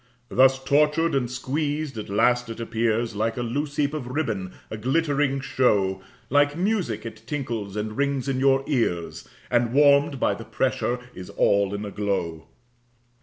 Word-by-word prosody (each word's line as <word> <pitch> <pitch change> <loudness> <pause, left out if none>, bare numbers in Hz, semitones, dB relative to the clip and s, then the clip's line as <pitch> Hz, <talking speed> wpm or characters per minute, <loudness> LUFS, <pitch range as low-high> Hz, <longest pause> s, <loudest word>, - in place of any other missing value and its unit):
Thus 130 +1 +5
tortured 150 +4 +2
and 130 -3 0
squeezed, 145 +3 -2
at 110 -2 -6
last 120 +4 +2
it 115 - -7
appears 115 -1 -1
Like 110 +3 -1
a 120 - -1
loose 140 +5 -3
heap 145 0 +1
of 145 -5 -4
ribbon, 115 -9 -2 0.2
a - - -3
glittering 140 +3 +1
show, 100 -8 +1 0.3
Like 145 +2 +2
music 180 - -1
it 110 -1 -8
tinkles 115 -9 -4
and 105 0 -3
rings 140 -1 0
in 135 -1 0
your 135 0 +3
ears, 115 - -2 0.2
And 120 -1 +2
warm'd 140 -1 +4
by - - +2
the - - -7
pressure 125 +1 -1
is 90 0 -9
all 100 0 +2
in 105 +1 -4
a 100 - -6
glow. 85 -6 -2
125 Hz, 165 wpm, -24 LUFS, 110-145 Hz, 0.3 s, Thus